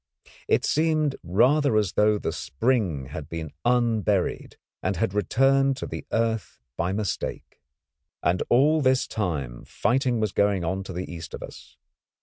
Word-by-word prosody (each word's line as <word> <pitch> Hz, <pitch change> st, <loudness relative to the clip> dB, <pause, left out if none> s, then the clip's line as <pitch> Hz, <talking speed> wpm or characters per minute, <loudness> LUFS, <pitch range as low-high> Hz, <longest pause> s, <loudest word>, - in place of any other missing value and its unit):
It -, -, +2 dB
seemed 155 Hz, -2 st, +1 dB
rather 125 Hz, -, +3 dB
as 105 Hz, -4 st, +1 dB
though 105 Hz, 0 st, +3 dB
the -, -, -3 dB
spring 80 Hz, -, -1 dB
had 75 Hz, +1 st, -7 dB
been 80 Hz, -3 st, -5 dB
unburied 115 Hz, -5 st, +1 dB, 0.2 s
and 95 Hz, +1 st, -1 dB
had 115 Hz, -2 st, -1 dB
returned 135 Hz, +7 st, +2 dB
to -, -, -4 dB
the -, -, -7 dB
earth 115 Hz, -1 st, -1 dB, 0.2 s
by 90 Hz, -, -1 dB
mistake. 105 Hz, 0 st, -4 dB, 0.6 s
And 90 Hz, +2 st, +1 dB
all 150 Hz, +6 st, +4 dB
this 130 Hz, -1 st, +2 dB
time 75 Hz, -, -3 dB
fighting 125 Hz, -1 st, 0 dB
was 110 Hz, -2 st, 0 dB
going 100 Hz, -3 st, +1 dB
on 95 Hz, +3 st, -1 dB
to 95 Hz, -, -7 dB
the 90 Hz, +2 st, -4 dB
east 85 Hz, -1 st, -7 dB
of -, -, -8 dB
us. -, -, -12 dB
105 Hz, 150 wpm, -25 LUFS, 90-130 Hz, 0.6 s, all